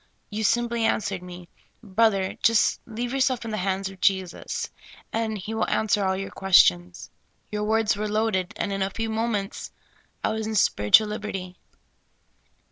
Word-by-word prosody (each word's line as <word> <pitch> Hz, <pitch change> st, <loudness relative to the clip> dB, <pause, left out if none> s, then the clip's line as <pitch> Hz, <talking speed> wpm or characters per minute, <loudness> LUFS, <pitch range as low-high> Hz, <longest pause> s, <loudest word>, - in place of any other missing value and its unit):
You 215 Hz, +1 st, -3 dB
simply 235 Hz, +1 st, +1 dB
answered 200 Hz, -4 st, 0 dB
me: 180 Hz, -1 st, -10 dB, 0.2 s
' -, -, -40 dB
Brother, 200 Hz, -4 st, +3 dB
just 230 Hz, -1 st, +3 dB
leave 240 Hz, +2 st, -4 dB
yourself 260 Hz, -3 st, +1 dB
in 225 Hz, -, -4 dB
the 215 Hz, -, -2 dB
hands 190 Hz, 0 st, -1 dB
of 195 Hz, -1 st, -11 dB
Jesus, 190 Hz, -3 st, -1 dB, 0.4 s
and 220 Hz, -1 st, -1 dB
He 205 Hz, +3 st, -6 dB
will 220 Hz, -, 0 dB
an 220 Hz, -, 0 dB
swer 205 Hz, 0 st, +3 dB
all 190 Hz, 0 st, 0 dB
your 195 Hz, 0 st, -5 dB
questions.' 90 Hz, -, +3 dB, 0.4 s
Your 210 Hz, 0 st, -2 dB
words 220 Hz, 0 st, +2 dB
were 210 Hz, +1 st, -3 dB
loaded, 210 Hz, -4 st, 0 dB
and 200 Hz, -, -2 dB
in 195 Hz, -, -3 dB
a 190 Hz, -, +1 dB
few 225 Hz, +3 st, -3 dB
moments 220 Hz, -3 st, -2 dB, 0.5 s
I -, -, +2 dB
was 220 Hz, 0 st, -2 dB
in 220 Hz, -, -3 dB
spiritual 200 Hz, -, +4 dB
lib 210 Hz, 0 st, -4 dB
erty." 185 Hz, -3 st, -5 dB
210 Hz, 175 wpm, -25 LUFS, 190-225 Hz, 0.5 s, spiritual